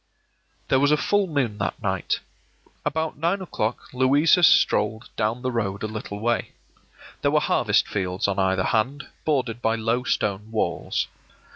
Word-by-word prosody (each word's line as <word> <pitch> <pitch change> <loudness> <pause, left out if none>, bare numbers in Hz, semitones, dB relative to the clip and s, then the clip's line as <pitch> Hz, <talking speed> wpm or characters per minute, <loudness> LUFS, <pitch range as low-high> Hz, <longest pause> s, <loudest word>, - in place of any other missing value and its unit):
There 130 - +4
was 145 +1 +3
a 150 - +4
full 205 +4 +1
moon 130 -10 -1
that 100 - -2
night. - - -1 0.6
About 160 0 -2
nine 170 +5 +1
o'clock 120 - -3
Louisa 140 +7 +4
strolled 110 -8 +3
down 115 +3 -1
the 130 - 0
road 100 -4 -2
a - - 0
little 105 -1 -6
way. 120 +2 -1 0.7
There - - +2
were - - +3
harvest - - +2
fields 95 -1 -1
on 100 0 -1
either 95 -1 +2
hand, 130 +8 -1 0.2
bordered 125 -6 0
by 115 0 +2
low 115 +2 0
stone 105 -3 -1
walls. 110 -1 -1
115 Hz, 155 wpm, -24 LUFS, 105-145 Hz, 0.7 s, There